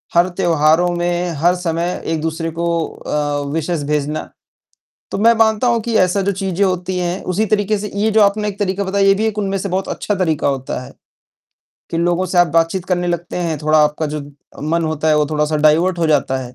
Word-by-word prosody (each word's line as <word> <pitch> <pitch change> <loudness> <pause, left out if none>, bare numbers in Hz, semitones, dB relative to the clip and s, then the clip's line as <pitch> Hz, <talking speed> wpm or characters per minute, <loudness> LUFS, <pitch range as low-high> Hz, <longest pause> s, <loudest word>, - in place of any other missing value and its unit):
हर 175 +2 +4
त्योहारों 160 +1 +3
में, 175 +1 -1
हर 175 +5 +3
समय 175 0 -2
एक-दूसरे 160 +1 -2
को 170 +1 -3 0.2
अ, 145 -1 -3
विशेज़ 160 -1 -2
भेजना। 150 +1 -2 0.8
तो - - -3
मैं 230 +3 +5
मानता 220 +1 +2
हूँ 235 -1 +2
कि 230 0 -3
ऐसा 185 +2 +2
जो 200 +1 0
चीज़ें 190 0 -1
होती 185 -1 -1
हैं 180 +1 -2
उसी 215 +5 +1
तरीके 210 0 +1
से 205 0 -5
ये 215 +2 +1
जो 220 0 +3
आपने 210 +1 +2
एक 200 -1 -6
तरीका 200 0 -1
बताया 195 +1 +1
ये 195 - +6
भी 210 +3 -1
एक 215 -1 -2
उनमें 195 -1 -1
से 195 - -3
बहुत 190 +1 -2
अच्छा 205 - -2
तरीका 165 -7 0
होता 135 -2 -3
है, - - -12 1.0
कि 165 - -2
लोगों 175 +2 +1
से 180 0 0
आप 175 - +6
बातचीत 165 +2 +1
करने 180 -1 -1
लगते 175 0 -3
हैं, 170 -3 -1
थोड़ा 155 +1 +2
आपका 150 +1 -1
जो 150 - -3 0.5
मन 170 0 +1
होता 155 0 -1
है 155 - +4
वो 150 -1 +2
थोड़ा-सा 150 0 0
डाइवर्ट 160 +4 +3
हो 165 - +1
जाता 145 -3 +1
है। 125 0 -11
175 Hz, 215 wpm, -18 LUFS, 155-195 Hz, 1.0 s, ये